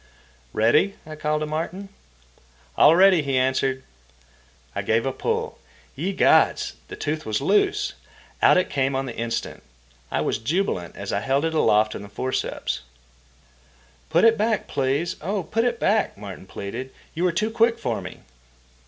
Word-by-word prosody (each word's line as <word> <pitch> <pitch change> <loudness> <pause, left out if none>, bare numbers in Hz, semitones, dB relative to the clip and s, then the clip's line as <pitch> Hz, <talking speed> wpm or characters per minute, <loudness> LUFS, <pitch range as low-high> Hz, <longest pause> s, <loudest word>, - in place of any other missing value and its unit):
"Ready?" 120 - +3
I 155 0 -8
called 150 0 -1
to - - 0
Martin. 165 +6 -4 0.9
"All 160 - +7
ready," 185 -2 +6
he 135 -2 -1
answered. 130 +1 +1 0.9
I - - -2
gave 115 +2 +1
a 135 - 0
pull. - - -2 0.4
Ye 170 +9 -2
gods! 195 - +3
The - - -8
tooth 155 +1 -3
was 110 -1 -1
loose! 195 +9 +1 0.5
Out - - +6
it 185 - +2
came 135 -1 0
on 135 0 -1
the 120 - -6
instant. 115 0 -3 0.5
I - - -1
was - - -1
jubilant 115 - -1
as 100 0 -5
I 100 - +1
held 135 +6 0
it 165 - -1
aloft 105 -8 +3
in - - -6
the 100 - -10
forceps. 130 - -3 1.3
"Put - - +4
it 225 -1 +5
back, 215 0 0
please, 140 +5 -1
oh, 195 +4 -2
put 225 +8 0
it 240 -1 0
back," 210 - +1
Martin 100 -2 -9
pleaded. 100 +8 -6 0.2
"You 170 - -2
were 180 - +3
too 215 +6 -1
quick 230 0 +3
for 115 -5 -2
me." 90 0 -9
145 Hz, 165 wpm, -24 LUFS, 115-190 Hz, 1.3 s, All